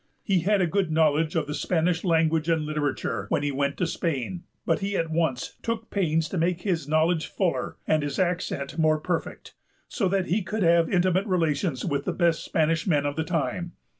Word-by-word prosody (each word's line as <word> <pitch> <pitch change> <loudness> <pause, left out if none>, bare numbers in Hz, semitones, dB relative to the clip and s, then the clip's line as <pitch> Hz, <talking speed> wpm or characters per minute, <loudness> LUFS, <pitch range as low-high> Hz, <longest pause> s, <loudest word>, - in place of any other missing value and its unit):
He 195 -5 +2
had 195 +3 +2
a - - +4
good 190 +1 0
knowledge 155 0 +2
of 160 -2 +1
the 150 - -4
Spanish 165 +2 0
language 160 -2 +2
and 160 -2 +2
literature 150 -2 -2
when - - +1
he 145 - 0
went 140 +1 -1
to 180 - +1
Spain; 165 0 -2 0.2
but - - +1
he 200 0 -2
at 165 -1 -1
once 160 -7 -1
took 225 -1 -3
pains 165 -5 +1
to 185 - -2
make 175 +1 0
his 170 -7 -1
knowledge 160 +1 +2
fuller 185 -4 -1
and 155 -1 +2
his 145 -1 -3
accent 175 -4 -1
more 155 -1 +3
perfect, 170 +2 -4 0.3
so 195 - -1
that 190 -1 +1
he 200 +5 +1
could 210 +3 -2
have 170 -1 +4
intimate 185 +2 +2
relations 160 -6 0
with 140 -4 -1
the - - -1
best 170 -2 +1
Spanish 165 +2 0
men 145 -5 +2
of 145 0 -1
the 160 - -1
time. 175 +1 -2
165 Hz, 200 wpm, -26 LUFS, 155-180 Hz, 0.3 s, a